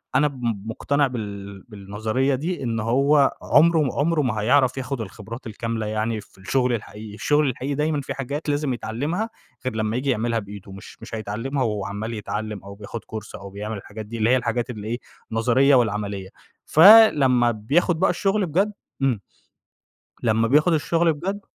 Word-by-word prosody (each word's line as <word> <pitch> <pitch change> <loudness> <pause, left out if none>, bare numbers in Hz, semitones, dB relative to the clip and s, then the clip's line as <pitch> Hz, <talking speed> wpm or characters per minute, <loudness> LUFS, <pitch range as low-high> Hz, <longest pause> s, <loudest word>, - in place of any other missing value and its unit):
أنا 145 +3 +4
بم 120 -7 -3
مُقتنع 140 +5 0
بال 100 -5 -7
بالنظرية 110 +6 -1
دي، 165 +4 -3
إن 115 -2 -1
هو 140 +6 +3
عُمره 165 +1 +4
م 135 - +1
عُمره 155 +2 +1
ما 125 -5 0
هيعرف 130 +3 +3
ياخد 130 -1 -3
الخبرات 110 +3 -8
الكاملة 115 0 -3
يعني 110 +1 -2
في 100 - -21
الشغل 125 +6 0
الحقيقي، 105 -1 -6
الشغل 145 +7 +2
الحقيقي 130 +3 -3
دايمًا 150 0 0
في 135 - -5
حاجات 140 +3 -4
لازم 145 -2 0
يتعلّمها، 145 - -3 0.4
غير 130 - -2
لمّا 110 0 -1
ييجي 130 +3 -1
يعملها 115 -1 +1
بإيده، 100 -1 -10
مش 95 +1 -11
مش - - -7
هيتعلّمها 115 +6 -2
وهو 105 -4 -2
عَمّال 105 +4 -4
يتعلّم 105 -1 -4
أو 100 0 -10
بياخد 105 +3 -7
course 110 -1 -8
أو 100 - -9
بيعمل 105 +2 -5
الحاجات 105 +2 -9
دي 115 +2 -7
اللي 110 +1 +2
هي 130 - +5
الحاجات 120 0 -2
اللي 110 -3 -6
إيه، 120 +2 -2 0.3
النظرية 125 +5 +4
والعملية. 105 -5 0 0.4
فلمّا 150 - +7
بياخد 145 - +1
بقى - - +3
الشغل 195 +3 +1
بجد 190 +6 +1 0.3
إمم، 130 -6 +1 1.0
لمّا 115 0 +2
بياخد 150 +7 +4
الشغل 165 +2 +2
بجد 195 +7 -4
120 Hz, 170 wpm, -23 LUFS, 110-145 Hz, 1.0 s, فلمّا